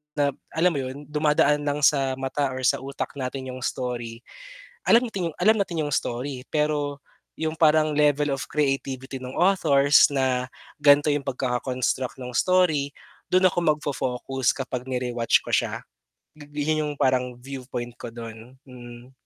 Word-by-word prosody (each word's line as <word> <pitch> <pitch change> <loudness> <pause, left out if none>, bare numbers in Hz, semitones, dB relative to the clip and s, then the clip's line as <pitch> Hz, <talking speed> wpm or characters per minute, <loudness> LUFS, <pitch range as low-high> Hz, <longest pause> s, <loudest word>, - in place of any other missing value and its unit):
na 145 -1 +2 0.2
alam 170 +2 +2
mo 145 - -2
yun, 130 +3 -6
dumadaan 150 0 +2
lang 145 0 -1
sa 135 -2 +3
mata 135 +2 -1
or 130 0 -5
sa - - +3
utak 135 +1 -5
natin 130 0 -4
'yong 130 - -7
story. 120 -2 -4 0.6
Alam 235 0 +4
ting 170 -6 -3
alam 220 +1 +5
natin 170 -5 -1
'yong 145 - -3
story, 130 0 -3
pero 150 -2 -1 0.3
yung 160 0 -2
parang 155 -1 +4
level 145 -1 +2
of 135 +1 -3
creativity 135 -2 -2
nung 130 0 -8
authors 150 -7 +5
na 130 -2 0 0.3
gan'to 145 +1 +5
yung 145 -1 -1
pagkaka-construct 125 0 -1
ng 125 -1 -6
story, 165 -6 +2 0.4
dun 185 +1 +5
ako 180 - -3 0.2
magfo-focus 135 -3 -1
kapag 130 -2 -4
ni-rewatch 125 -2 +1
ko - - -9
siya. - - 0 0.5
Yun 150 +1 -2
yung 150 - -3
parang 125 -1 +1
viewpoint 125 -2 -6
ko - - -6
dun. 115 +1 -9
Mm. 120 0 -12
140 Hz, 150 wpm, -25 LUFS, 125-150 Hz, 0.6 s, alam